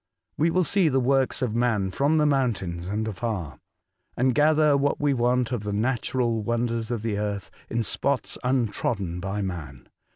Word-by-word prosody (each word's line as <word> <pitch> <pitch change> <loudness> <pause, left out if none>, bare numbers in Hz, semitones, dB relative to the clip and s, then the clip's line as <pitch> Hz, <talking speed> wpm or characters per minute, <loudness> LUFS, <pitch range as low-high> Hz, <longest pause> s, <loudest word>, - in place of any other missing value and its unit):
We 160 +3 +2
will 185 +2 +2
see 185 -1 +2
the 135 -1 +2
works 130 +1 +1
of 115 -4 -1
man 115 -5 +1
from 145 +9 +2
the 150 - +3
mountains 105 -12 0
and 105 +3 -2
afar, 105 - -4 0.6
and 130 +1 +3
gather 150 0 +4
what 140 +1 +1
we 145 -1 +2
want 125 0 +1
of 120 -4 -1
the 105 -1 -3
natural 120 +1 0
wonders 115 0 -1
of 120 -3 -3
the 105 -3 -1
earth 105 -2 -3 0.2
in 115 0 0
spots 140 +5 -1
untrodden 110 -7 -1
by 100 +2 -3
man. 75 -9 -6
120 Hz, 170 wpm, -25 LUFS, 105-135 Hz, 0.6 s, gather